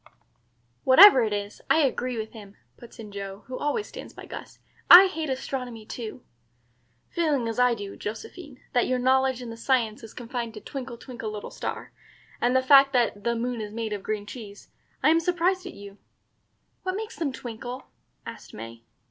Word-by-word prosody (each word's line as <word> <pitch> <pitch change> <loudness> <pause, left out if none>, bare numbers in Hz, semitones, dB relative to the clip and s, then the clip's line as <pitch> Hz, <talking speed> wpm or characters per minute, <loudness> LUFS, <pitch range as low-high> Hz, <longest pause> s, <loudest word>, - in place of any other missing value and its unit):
"Whatever 265 +1 +9
it 220 -2 0
is, 205 0 -4
I 320 - +5
agree 255 -3 0
with 220 0 -4
him," 205 -3 -12 0.2
puts 240 - -14
in 215 -3 -9
Joe, 200 0 -7
who 255 - -7
always 295 +9 -1
stands - - -10
by - - -11
Gus. - - -9 0.3
"I 360 +2 +12
hate 320 -5 -3
astronomy 250 -4 -4
too." 235 +2 -7 0.9
"Feeling 295 -8 0
as 225 +1 -3
I 250 -1 +4
do, 200 -2 -7
Josephine, 260 - -8
that 245 - +2
your 255 - +1
knowledge 260 0 +2
in 235 - -7
the 230 - -9
science 230 -3 0
is 225 -2 -12
confined 235 -2 -5
to - - -7
'Twinkle, 255 0 -7
twinkle, 235 -3 -7
little 210 -1 -7
star,' - - -5 0.5
and 245 +1 +2
the 260 - +3
fact 275 0 +7
that 230 -5 +1
'the 235 +1 0
moon 240 0 -2
is 210 -1 -6
made 220 -1 -3
of 205 - -4
green 210 0 -3
cheese,' 210 -2 -10 0.3
I - - +6
am 330 - +4
surprised 360 +2 0
at 360 - -9
you." 200 0 -12 0.8
"What 370 0 -3
makes 435 +2 -5
them 310 -5 -2
twinkle?" 245 +1 -7 0.4
asked - - -10
May. 115 +1 -9
245 Hz, 185 wpm, -26 LUFS, 215-270 Hz, 0.9 s, I